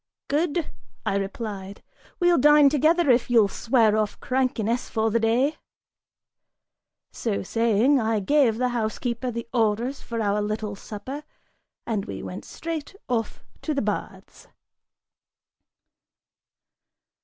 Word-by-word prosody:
"Good," 320 +2 0 0.3
I - - 0
replied, 200 -1 -5 0.4
"we'll 350 -2 +4
dine 295 +1 +7
together 310 +2 +3
if 240 0 +2
you'll 230 -4 +5
swear 225 0 +2
off 215 -1 -1
crankiness 250 -2 -1
for 220 -1 0
the 230 - +2
day." 240 +7 +2 1.5
(So 220 -4 -2
saying,) 230 +6 +3
I 220 -1 +1
gave 240 +1 +3
the 250 +1 +1
housekeeper 235 +1 -2
the 235 -1 -5
orders 235 +3 0
for 230 -1 -5
our 210 -1 +1
little 210 0 -3
supper 225 +9 -7 0.6
(and 210 -4 -2
we - - -6
went - - -7
straight 325 +2 -6
off 230 -3 -2 0.2
to 305 - -2
the 275 - 0
baths.) 210 -1 -5
235 Hz, 120 wpm, -25 LUFS, 215-275 Hz, 1.5 s, dine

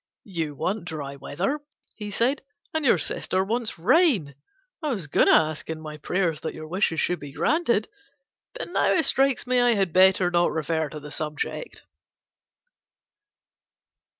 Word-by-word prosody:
"You 165 -7 -4
want 195 +6 -2
dry 145 -5 -6
weather," 185 - -3 0.3
he 210 -1 -7
said, 240 +7 0 0.3
"and 315 -1 -1
your 245 -8 +4
sister 185 +4 0
wants 225 +2 +1
rain. 225 - +3 0.5
I 305 - -2
was 205 - -2
going 145 - +2
to - - +6
ask 155 0 +2
in 160 -1 -4
my 155 -1 -8
prayers 165 0 -1
that - - -5
your 155 - -8
wishes 170 -1 0
should 180 -2 0
be 145 -2 -9
granted; 265 - +1 0.7
but - - -5
now - - +2
it 325 - +3
strikes 270 -1 +2
me 250 0 +2
I 245 -1 +4
had 195 -4 0
better 185 -1 +5
not 175 0 +2
refer 160 0 -1
to 150 - -8
the 150 0 -10
subject." 155 - -5
180 Hz, 160 wpm, -25 LUFS, 155-235 Hz, 0.7 s, to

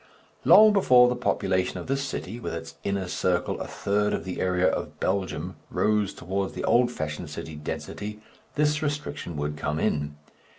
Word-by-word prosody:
Long 215 0 +8
before 125 -11 +6
the 125 - +1
population 95 -6 0
of - - -6
this 135 +1 -1
city, 120 -5 -5
with - - -4
its - - -7
inner 100 -2 -1
circle 90 0 0
a - - -4
third 105 +1 0
of - - -4
the 95 - -4
area 90 0 +2
of - - -2
Belgium, 95 -1 -2
rose 105 -2 +1
towards 95 +2 -3
the - - -5
old 120 0 +4
fashioned 75 -7 -4
city 80 - -7
density, 105 +7 -5 0.4
this 150 0 +2
restriction 145 - -3
would 75 +1 -2
come 75 +1 -2
in. 75 -1 0
100 Hz, 170 wpm, -26 LUFS, 90-125 Hz, 0.4 s, Long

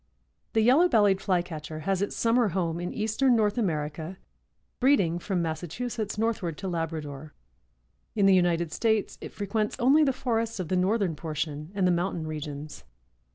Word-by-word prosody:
The 220 - +3
Yellow 275 +11 +5
bellied 205 - +4
Flycatcher 160 -5 -2
has 195 +2 0
its 200 - -2
summer 230 0 +3
home 170 -3 -1
in 175 0 -3
eastern 225 +4 +2
North 210 -2 +2
America, 160 -4 -2 0.6
breeding 200 - +3
from 180 -1 -1
Massachusetts 200 +8 -4
northward 210 -8 -1
to 195 - -5
Labrador. 155 -4 -4 0.8
In 205 -2 +3
the 195 - +6
United 170 -3 +2
States 220 +2 0
it - - -6
frequents 210 +1 -2
only 275 +6 +5
the 275 - +3
forests 230 -4 -2
of 175 -3 -4
the 185 - +1
northern 185 -1 +1
portion 150 -1 -4
and 195 -2 +1
the 180 - +4
mountain 175 -1 -1
regions. 150 -1 -6
185 Hz, 155 wpm, -27 LUFS, 165-220 Hz, 0.8 s, the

